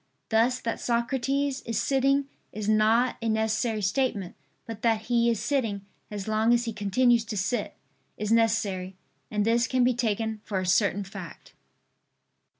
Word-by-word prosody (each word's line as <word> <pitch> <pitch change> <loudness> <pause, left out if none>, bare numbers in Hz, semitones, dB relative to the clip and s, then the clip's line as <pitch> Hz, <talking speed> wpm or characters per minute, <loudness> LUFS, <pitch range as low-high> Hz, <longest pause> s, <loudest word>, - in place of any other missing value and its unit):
Thus 235 +3 +2
that 230 - -3
Socrates 265 +3 -1
is 230 -2 -2
sitting 275 +2 +2 0.2
is 210 -1 -5
not 220 +3 +3
a 230 - -1
necessary 220 0 0
statement; 200 -3 -1 0.3
but 225 -2 -8
that 225 -2 +2
he 235 +1 +2
is 230 -3 0
sitting, 220 -5 -1 0.2
as 205 -1 -6
long 220 +2 +3
as 240 0 -1
he 230 - -3
continues 230 +4 +2
to 220 -1 -5
sit, 200 +6 -2 0.4
is 210 0 -3
necessary; 205 -5 +1 0.3
and 210 -1 0
this 235 +2 +2
can 255 -1 +2
be 250 +1 +3
taken 220 -2 -2
for 200 - -3
a 185 - -3
certain 200 +2 +2
fact. 195 -4 -10
225 Hz, 155 wpm, -27 LUFS, 210-240 Hz, 0.4 s, not